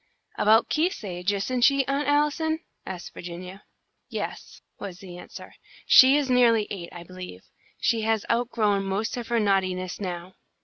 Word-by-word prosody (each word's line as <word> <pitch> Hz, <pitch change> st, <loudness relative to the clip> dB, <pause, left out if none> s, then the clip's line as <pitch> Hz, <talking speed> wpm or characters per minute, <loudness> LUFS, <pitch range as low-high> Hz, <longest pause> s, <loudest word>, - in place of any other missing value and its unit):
"About 220 Hz, +2 st, +4 dB
Keith's 335 Hz, -, 0 dB
age, 180 Hz, 0 st, -2 dB
isn't 220 Hz, +5 st, -2 dB
she, 275 Hz, +2 st, +4 dB
Aunt 275 Hz, +2 st, -1 dB
Allison?" 300 Hz, +2 st, +1 dB, 0.3 s
asked 180 Hz, -2 st, -7 dB
Virginia. 180 Hz, +3 st, -9 dB, 0.4 s
"Yes," -, -, -6 dB, 0.2 s
was 190 Hz, -3 st, -7 dB
the 180 Hz, -2 st, -11 dB
answer. -, -, -11 dB, 0.3 s
"She 265 Hz, +2 st, +8 dB
is 290 Hz, -2 st, 0 dB
nearly 235 Hz, -4 st, +4 dB
eight, 175 Hz, -4 st, -6 dB
I 175 Hz, -, -9 dB
believe. 180 Hz, -, -10 dB, 0.4 s
She 230 Hz, -1 st, +1 dB
has 220 Hz, -1 st, 0 dB
outgrown 225 Hz, -4 st, +1 dB
most 195 Hz, +3 st, -2 dB
of 240 Hz, -2 st, -5 dB
her 235 Hz, -1 st, +1 dB
naughtiness 185 Hz, -3 st, 0 dB
now." 180 Hz, -1 st, -5 dB
210 Hz, 150 wpm, -26 LUFS, 185-250 Hz, 0.4 s, She